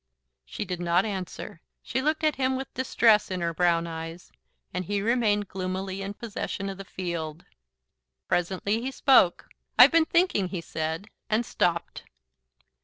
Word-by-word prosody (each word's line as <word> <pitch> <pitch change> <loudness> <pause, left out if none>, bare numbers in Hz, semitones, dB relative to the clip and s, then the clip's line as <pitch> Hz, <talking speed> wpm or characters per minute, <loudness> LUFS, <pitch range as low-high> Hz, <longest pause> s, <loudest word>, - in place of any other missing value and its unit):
She 205 - -5
did 180 -2 -4
not 175 +2 +2
answer. 190 -4 -6 0.2
She 260 - -2
looked 310 +3 0
at 305 -3 +2
him 260 0 +1
with 265 0 -5
distress 230 -4 +3
in 185 -1 -2
her 170 0 -1
brown 170 0 +2
eyes, 165 +1 -7 0.4
and 185 - -2
he 205 +3 -1
remained 210 -2 +1
gloomily 190 +1 -4
in 200 +1 -5
possession 200 -3 -4
of 195 - -10
the - - -5
field. 170 -4 -5 0.8
Presently 190 +5 0
he 260 - -2
spoke. 260 -9 +4 0.3
"I've - - +9
been 330 -1 +5
thinking," 335 - +2
he 180 -1 -4
said, 160 +4 -4 0.2
and 225 +2 +1
stopped. 170 -5 -1
195 Hz, 155 wpm, -27 LUFS, 175-230 Hz, 0.8 s, I've